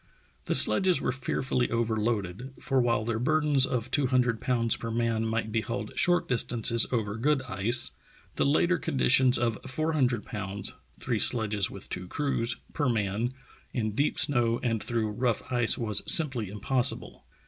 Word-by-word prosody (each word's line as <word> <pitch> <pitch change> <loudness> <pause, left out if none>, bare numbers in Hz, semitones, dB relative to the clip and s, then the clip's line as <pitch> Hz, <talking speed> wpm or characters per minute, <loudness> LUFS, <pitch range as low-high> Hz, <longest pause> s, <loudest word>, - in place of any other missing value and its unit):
The - - -1
sledges 185 -3 +4
were - - -2
fearfully 130 -1 -2
overloaded, 115 0 -3
for 135 -2 0
while 115 -3 0
their 115 -1 -2
burdens 145 0 +2
of 125 -4 -4
two 145 -3 +1
hundred 125 -3 0
pounds 115 -3 0
per 115 - -7
man 115 -1 -1
might 110 0 -3
be 110 0 -1
hauled 120 +2 -6
short 175 0 +1
distances 115 -1 +3
over 105 -4 -2
good 135 +3 0
ice, 110 +3 +2 0.4
the - - 0
later 170 +5 +1
conditions 130 -3 +2
of 115 -3 -2
four 155 +5 -2
hundred 125 -7 0
pounds 100 -1 -7 0.3
(three - - -2
sledges 105 -4 +3
with - - -12
two 90 0 -7
crews) 120 -2 0 0.2
per 145 -4 -1
man, 110 +2 -2 0.4
in 110 -3 -2
deep 140 +8 -1
snow 120 -4 +1
and 115 -3 -2
through 115 -3 -2
rough 120 +1 -2
ice, 120 -2 +2
was 110 -4 +4
simply 130 - +4
impossible. 125 +6 -2
120 Hz, 160 wpm, -27 LUFS, 110-130 Hz, 0.4 s, sledges